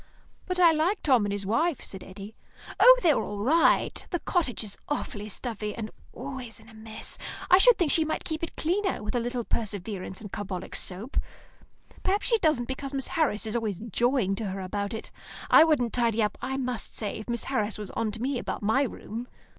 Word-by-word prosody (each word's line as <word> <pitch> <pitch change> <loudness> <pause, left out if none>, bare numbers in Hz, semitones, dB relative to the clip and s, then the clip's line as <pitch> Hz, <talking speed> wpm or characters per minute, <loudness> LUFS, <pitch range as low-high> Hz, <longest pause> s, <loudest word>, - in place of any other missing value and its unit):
"But 365 -1 -1
I 345 -2 +8
like 325 +6 +1
Tom 250 -8 +4
and - - -2
his 200 -1 -3
wife," 270 - +1
said 190 -2 -5
Eddy. 195 +3 -10 0.5
"Oh, - - +9
they're 320 -5 +4
all 205 - -5
right. 320 +8 +3
The 350 - 0
cottage 320 -9 -1
is 205 -2 -4
awfully 210 -7 -3
stuffy, 210 -1 -4
and 220 -2 -5 0.2
always 255 -3 -7
in 220 - -18
a - - -15
mess. 220 0 -6 0.3
I 365 - +9
should 485 +1 +7
think 330 -5 +2
she 320 - +5
might 315 - -2
keep 315 -1 -4
it 335 - -5
cleaner, 365 - 0
with 210 - -3
a 245 - +2
little 240 +1 -2
perseverance 200 -4 -4
and 205 -3 -9
carbolic 195 -3 -5
soap. 195 +8 -5 0.8
Perhaps 395 +2 0
she 460 -2 +4
doesn't 305 - +2
because 270 +1 -4
Miss 270 - -2
Harris 295 -11 +1
is 220 +1 -3
always 220 -5 -1
jawing 230 0 +1
to 220 - -2
her 195 0 -3
about 200 +3 -3
it. 220 - -7 0.4
I - - +10
wouldn't 285 -8 +2
tidy 230 -2 +2
up, 210 - 0
I 265 +1 -2
must 250 -3 -3
say, 210 -2 -3
if 220 - -9
Miss 235 -1 -1
Harris 215 -5 -1
was 210 -3 -6
on 225 -1 -1
to 225 - -6
me 265 -1 0
about - - -4
my 220 +6 +3
room. 240 -2 -4
235 Hz, 210 wpm, -27 LUFS, 210-300 Hz, 0.8 s, I